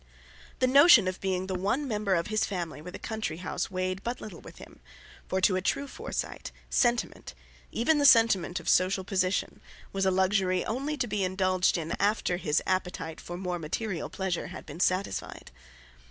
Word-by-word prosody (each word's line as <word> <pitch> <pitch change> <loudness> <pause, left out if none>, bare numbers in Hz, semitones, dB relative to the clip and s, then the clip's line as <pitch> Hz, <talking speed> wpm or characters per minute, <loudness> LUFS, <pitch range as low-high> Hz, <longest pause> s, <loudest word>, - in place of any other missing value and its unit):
The - - +2
notion 265 - +7
of 185 0 -3
being 185 -1 -1
the 190 - -4
one 205 +10 -1
member 210 -4 0
of 170 -1 0
his 215 0 0
family 175 -7 -4
with 180 +3 -9
a - - -5
country 220 -8 -4
house 180 - -3
weighed 185 0 -2
but 240 +3 -4
little 195 -6 -9
with - - -13
him; - - -14 0.5
for 190 - 0
to 185 - +4
a 185 - 0
true 275 +8 -1
Forsyte, - - -5 0.2
sentiment, 240 - 0 0.4
even 295 +7 +2
the 285 - +3
sentiment 225 -8 +4
of - - -12
social 185 +1 +3
position, 185 -1 -1 0.3
was 195 -1 +1
a - - +5
luxury 190 -1 +1
only 275 +6 -2
to 260 - 0
be 210 -3 -1
indulged 185 0 +1
in 165 0 -4
after 200 -3 +1
his 155 -4 0
appetite 180 -3 -2
for 175 - -7
more 180 -1 -3
material 170 +3 -3
pleasure 190 -3 -3
had 185 - -9
been - - -9
satisfied. 185 - -1
190 Hz, 185 wpm, -28 LUFS, 180-215 Hz, 0.5 s, notion